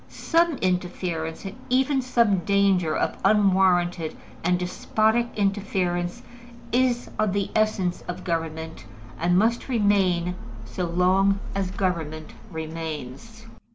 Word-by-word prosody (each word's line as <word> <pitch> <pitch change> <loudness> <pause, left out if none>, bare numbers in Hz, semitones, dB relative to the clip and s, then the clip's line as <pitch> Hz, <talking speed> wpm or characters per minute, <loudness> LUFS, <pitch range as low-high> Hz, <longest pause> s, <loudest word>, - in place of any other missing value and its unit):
Some 335 -3 +1
interference, 180 -2 -2
and 195 +1 -6
even 265 +2 +2
some 235 -6 +2
danger 195 -4 +2
of - - -1
unwarranted 185 -5 +3 0.3
and 180 +1 +2
despotic 220 +6 +1
interference, 190 -4 -1 0.5
is 245 0 +1
of 215 -3 +2
the 200 -1 -1
essence 215 -5 +1
of 180 +1 -5
government, 160 -3 -4 0.3
and 175 +2 +2
must 230 +6 +1
remain 195 -6 +2 0.3
so 180 +10 -3
long 185 +3 +2
as 195 -2 -1
government 165 -5 -3 0.2
remains. 160 - -6
185 Hz, 110 wpm, -25 LUFS, 175-210 Hz, 0.5 s, unwarranted